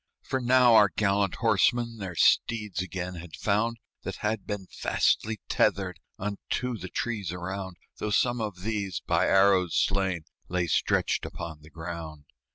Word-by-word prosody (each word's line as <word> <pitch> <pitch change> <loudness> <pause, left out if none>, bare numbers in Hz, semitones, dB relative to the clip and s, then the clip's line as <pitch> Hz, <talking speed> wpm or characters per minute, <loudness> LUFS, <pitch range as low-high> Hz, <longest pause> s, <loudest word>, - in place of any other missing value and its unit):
For 130 - -1
now 125 -1 +5
our 105 -3 +7
gallant 100 -2 +1
horsemen 120 -2 +2
Their 95 -3 -5
steeds 105 -1 +2
again 90 0 -4
had 85 -1 -9
found, 115 +3 0 0.2
That - - -5
had 105 -1 -1
been 105 -2 -4
fastly 110 +3 0
tethered - - +1 0.2
Unto 105 +5 -3
the 95 -4 -7
trees 105 -8 -2
around, 95 +1 -5 0.2
Though 105 - -3
some 120 +3 +2
of 105 -4 -4
these, 100 -4 -2
by - - +2
arrows 95 -3 +4
slain, 95 -4 +1 0.3
Lay 90 0 0
stretched 85 - +1
upon 80 -3 -7
the 75 - -15
ground. 80 -2 -7
100 Hz, 150 wpm, -28 LUFS, 90-110 Hz, 0.3 s, our